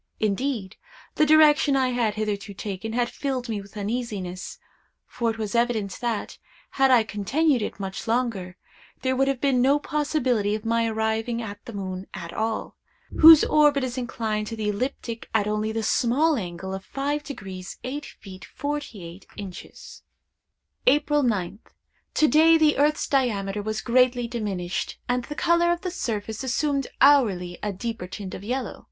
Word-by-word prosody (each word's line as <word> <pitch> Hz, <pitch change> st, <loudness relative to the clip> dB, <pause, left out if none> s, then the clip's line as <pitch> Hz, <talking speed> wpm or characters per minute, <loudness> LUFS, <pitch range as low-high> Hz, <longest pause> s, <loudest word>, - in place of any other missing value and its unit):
Indeed, 215 Hz, -1 st, -1 dB, 0.4 s
the 305 Hz, -, +3 dB
direction 300 Hz, -2 st, +5 dB
I 260 Hz, -1 st, +2 dB
had 235 Hz, -4 st, 0 dB
hitherto 210 Hz, -1 st, -3 dB
taken, 205 Hz, +3 st, -5 dB
had 240 Hz, 0 st, +1 dB
filled 260 Hz, -1 st, -3 dB
me 215 Hz, -3 st, -3 dB
with 200 Hz, +1 st, -14 dB
uneasiness; 205 Hz, -4 st, -4 dB, 0.5 s
for 235 Hz, -1 st, -2 dB
it 225 Hz, -, -3 dB
was 215 Hz, -2 st, -4 dB
evident 235 Hz, -5 st, 0 dB
that, 235 Hz, -3 st, -3 dB, 0.3 s
had 270 Hz, 0 st, +3 dB
I 245 Hz, -3 st, +6 dB
continued 250 Hz, +7 st, +1 dB
it 210 Hz, -, -4 dB
much 195 Hz, +3 st, -5 dB
longer, 225 Hz, -6 st, -1 dB, 0.5 s
there 260 Hz, 0 st, +1 dB
would 270 Hz, +1 st, +2 dB
have 275 Hz, -2 st, 0 dB
been 265 Hz, -3 st, +2 dB
no 275 Hz, +3 st, +4 dB
possibility 265 Hz, -9 st, 0 dB
of 215 Hz, +1 st, -7 dB
my 230 Hz, 0 st, +1 dB
arriving 220 Hz, +1 st, -1 dB
at 205 Hz, -3 st, -7 dB
the 235 Hz, -, -8 dB
moon 190 Hz, -1 st, -5 dB
at 170 Hz, 0 st, -7 dB
all, 220 Hz, 0 st, -2 dB, 0.4 s
whose 320 Hz, -1 st, +10 dB
orbit 295 Hz, -2 st, +4 dB
is 250 Hz, -1 st, -3 dB
inclined 220 Hz, -4 st, -2 dB
to 225 Hz, -, -5 dB
the 215 Hz, -1 st, -2 dB
ecliptic 230 Hz, +1 st, -4 dB
at 210 Hz, -2 st, +3 dB
only 215 Hz, +1 st, -1 dB
the 225 Hz, 0 st, -2 dB
small 275 Hz, +9 st, +2 dB
angle 190 Hz, -3 st, -5 dB
of 190 Hz, 0 st, -5 dB
5° 275 Hz, -10 st, -4 dB
8′ 255 Hz, -8 st, -8 dB, 0.2 s
48″. 200 Hz, -9 st, -7 dB, 0.9 s
"April 295 Hz, +1 st, +4 dB
9th. 205 Hz, -6 st, -1 dB, 0.6 s
To 310 Hz, -, +4 dB
day 320 Hz, +2 st, +6 dB
the 305 Hz, -3 st, +3 dB
earth's 295 Hz, +1 st, +2 dB
diameter 210 Hz, -7 st, 0 dB
was 215 Hz, +1 st, -3 dB
greatly 245 Hz, 0 st, +2 dB
diminished, 200 Hz, -7 st, -3 dB
and 245 Hz, 0 st, 0 dB
the 295 Hz, -, -7 dB
color 340 Hz, +2 st, +3 dB
of 345 Hz, 0 st, -1 dB
the 365 Hz, -, -3 dB
surface 220 Hz, -, -4 dB
assumed 275 Hz, +2 st, 0 dB
hourly 205 Hz, -11 st, +4 dB
a 210 Hz, -, -2 dB
deeper 225 Hz, 0 st, -5 dB
tint 190 Hz, 0 st, -7 dB
of 190 Hz, -, -7 dB
yellow. 250 Hz, +4 st, -3 dB
230 Hz, 160 wpm, -25 LUFS, 205-275 Hz, 0.9 s, whose